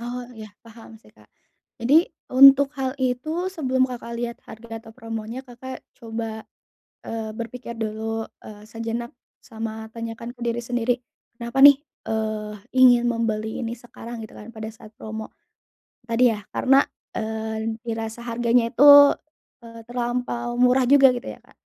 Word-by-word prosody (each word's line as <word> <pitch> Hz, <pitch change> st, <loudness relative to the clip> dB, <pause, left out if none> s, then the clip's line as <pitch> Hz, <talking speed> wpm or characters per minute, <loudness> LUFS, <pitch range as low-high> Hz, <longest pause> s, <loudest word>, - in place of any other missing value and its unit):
Oh, 245 Hz, +1 st, -5 dB
iya, 215 Hz, -1 st, -10 dB
paham 225 Hz, -1 st, -14 dB
sih, -, -, -21 dB
Kak. -, -, -22 dB, 0.5 s
Jadi 295 Hz, +9 st, +4 dB, 0.2 s
untuk 275 Hz, +1 st, +8 dB
hal 265 Hz, -1 st, -2 dB
itu, 265 Hz, +8 st, -1 dB
sebelum 260 Hz, -8 st, 0 dB
Kakak 235 Hz, -2 st, -7 dB
lihat 235 Hz, 0 st, -4 dB
harga 225 Hz, 0 st, -9 dB
atau 225 Hz, -, -13 dB
promonya, 225 Hz, +2 st, -6 dB
Kakak 260 Hz, +1 st, -9 dB
coba, 225 Hz, -1 st, -6 dB, 0.6 s
eee, 225 Hz, -1 st, -4 dB
berpikir 235 Hz, +2 st, -7 dB
dulu, 225 Hz, 0 st, -3 dB, 0.2 s
eee, 210 Hz, -1 st, -11 dB
sejenak, 230 Hz, +1 st, -5 dB, 0.3 s
sama 220 Hz, -1 st, -6 dB
tanyakan 230 Hz, +1 st, -6 dB
ke -, -, -30 dB
diri 235 Hz, 0 st, -1 dB
sendiri, 245 Hz, 0 st, 0 dB, 0.4 s
kenapa 235 Hz, +2 st, -4 dB
nih, 285 Hz, -1 st, +10 dB, 0.3 s
eee, 215 Hz, -1 st, -2 dB, 0.2 s
ingin 250 Hz, -2 st, +6 dB
membeli 220 Hz, -2 st, -2 dB
ini 230 Hz, 0 st, -4 dB
sekarang, 235 Hz, -1 st, -10 dB
gitu 220 Hz, -, -11 dB
kan, 210 Hz, +2 st, -11 dB
pada 220 Hz, -1 st, -6 dB
saat 215 Hz, -1 st, -15 dB
promo. 220 Hz, 0 st, -7 dB, 0.8 s
Tadi 240 Hz, +2 st, +4 dB
ya, 210 Hz, -, -7 dB
karena, 270 Hz, +1 st, +4 dB, 0.3 s
eee, 220 Hz, 0 st, -3 dB
dirasa 225 Hz, 0 st, -4 dB
harganya 235 Hz, 0 st, +1 dB
itu, 285 Hz, +2 st, +9 dB, 0.5 s
eee, 230 Hz, 0 st, -11 dB
terlampau 240 Hz, 0 st, -3 dB
murah 250 Hz, +1 st, +4 dB
juga, 270 Hz, -2 st, +7 dB
gitu 245 Hz, +2 st, -6 dB
ya, -, -, -9 dB
Kak. -, -, -24 dB
235 Hz, 145 wpm, -23 LUFS, 220-250 Hz, 0.8 s, nih